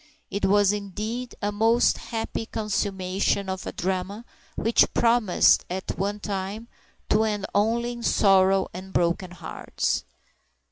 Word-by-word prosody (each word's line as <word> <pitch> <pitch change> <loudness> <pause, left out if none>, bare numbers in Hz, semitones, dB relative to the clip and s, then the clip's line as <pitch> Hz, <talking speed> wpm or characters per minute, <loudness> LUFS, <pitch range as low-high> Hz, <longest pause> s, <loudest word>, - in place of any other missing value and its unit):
It 200 - -1
was, 205 0 +4
indeed, 215 +5 -5
a 205 - +1
most 225 +3 +3
happy 225 -1 -4
consummation 200 -2 -1
of 190 -1 -4
a - - -3
drama 190 +4 -3 0.3
which 225 +1 +3
promised, 230 -5 +4
at 185 +1 -4
one 205 +2 -2
time, 205 +2 -4 0.4
to 215 +1 +3
end 210 -2 -1
only 230 +4 +1
in 240 -1 -7
sorrow 195 -3 +4
and 185 +2 -9
broken 175 +2 +1
hearts. 180 - -3
205 Hz, 130 wpm, -25 LUFS, 190-220 Hz, 0.4 s, was